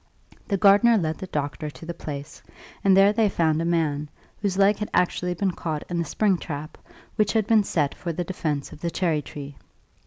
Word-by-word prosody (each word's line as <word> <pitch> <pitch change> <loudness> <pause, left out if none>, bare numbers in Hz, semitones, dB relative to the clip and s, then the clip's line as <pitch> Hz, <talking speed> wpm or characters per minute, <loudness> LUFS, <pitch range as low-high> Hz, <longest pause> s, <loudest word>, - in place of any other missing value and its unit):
The 200 - 0
gardener 205 +4 +6
led 160 -4 -1
the 190 - -6
doctor 145 -1 -3
to 155 - -12
the 170 - -4
place, 145 -2 -7 0.4
and 195 -1 +5
there 200 +1 +6
they 215 -1 +3
found 160 -4 +1
a - - -1
man, 155 -3 0 0.3
whose 195 -3 -1
leg 200 +1 +4
had 210 - -4
actually 180 0 +1
been 190 +2 0
caught 160 -3 -4
in 175 -1 -1
the 170 - 0
spring 195 +3 +1
trap 150 0 -6 0.4
which 210 -2 +2
had 220 -2 +2
been 220 -1 +4
set 150 -7 0
for 170 - -5
the 175 +2 -3
defence 155 -6 -3
of - - -11
the 170 - -1
cherry 165 -3 0
tree. 145 -1 -9
170 Hz, 210 wpm, -25 LUFS, 155-195 Hz, 0.4 s, gardener